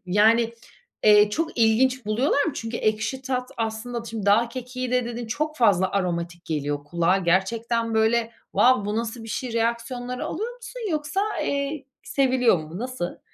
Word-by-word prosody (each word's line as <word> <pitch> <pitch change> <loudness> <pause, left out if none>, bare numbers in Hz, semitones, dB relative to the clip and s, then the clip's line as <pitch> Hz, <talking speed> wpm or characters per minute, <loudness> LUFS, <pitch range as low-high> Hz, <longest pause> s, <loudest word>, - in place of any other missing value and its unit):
yani, 225 +4 +3 0.5
eee, 210 0 +7
çok 320 +3 -2
ilginç 235 +2 +3
buluyorlar 265 +6 +2
mı? 320 - -1
Çünkü 230 0 -4
ekşi 220 +5 -1
tat 255 -1 -2
aslında, 230 +1 -3
şimdi 225 -3 -5
dağ 225 +4 +4
kekiği 255 +1 -5
de 250 -1 +2
dedin, 240 0 -5
çok 305 +7 -2
fazla 190 -6 +3
aromatik 175 -3 -2
geliyor 145 -2 -2
kulağa. 170 +4 +2
Gerçekten, 225 +6 0
böyle, 225 +1 +2 0.2
wow, 250 -4 +4
"Bu 210 +1 -2
nasıl 230 0 -3
bir - - -9
şey?" 240 +4 -3
reaksiyonları 235 +2 -2
alıyor 455 +7 -4
musun - - -9
yoksa, 305 +4 -1 0.2
eee, 280 +1 -2 0.2
seviliyor 255 -7 +2
mu? 155 +3 -8
Nasıl? 250 -7 -4
230 Hz, 155 wpm, -24 LUFS, 210-255 Hz, 0.5 s, eee